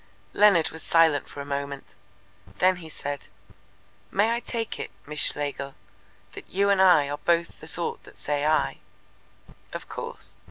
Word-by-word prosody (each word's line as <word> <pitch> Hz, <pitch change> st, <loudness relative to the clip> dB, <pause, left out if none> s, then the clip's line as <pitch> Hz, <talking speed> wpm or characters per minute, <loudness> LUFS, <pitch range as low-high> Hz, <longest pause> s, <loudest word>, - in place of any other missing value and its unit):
Leonard 200 Hz, -6 st, +5 dB
was 160 Hz, -, -9 dB
silent 160 Hz, -3 st, +3 dB
for 145 Hz, -, -7 dB
a -, -, -6 dB
moment. 140 Hz, -1 st, -5 dB, 0.6 s
Then 185 Hz, 0 st, +4 dB
he 165 Hz, -3 st, -10 dB
said: 145 Hz, -2 st, -5 dB, 0.8 s
"May 210 Hz, +3 st, +2 dB
I 235 Hz, -, +1 dB
take 230 Hz, -2 st, -4 dB
it, -, -, -4 dB, 0.2 s
Miss 150 Hz, +1 st, -5 dB
Schlegel, 140 Hz, -2 st, 0 dB, 0.6 s
that -, -, -11 dB
you 200 Hz, +2 st, +2 dB
and 195 Hz, -1 st, +4 dB
I 180 Hz, -7 st, +6 dB
are 145 Hz, +1 st, -4 dB
both 170 Hz, +1 st, +1 dB
the 155 Hz, -, -10 dB
sort 170 Hz, +1 st, -2 dB
that -, -, -15 dB
say 145 Hz, -1 st, -2 dB
'I'?" 150 Hz, -, +2 dB, 0.9 s
"Of -, -, -6 dB
course." -, -, -6 dB
160 Hz, 160 wpm, -26 LUFS, 145-185 Hz, 0.9 s, I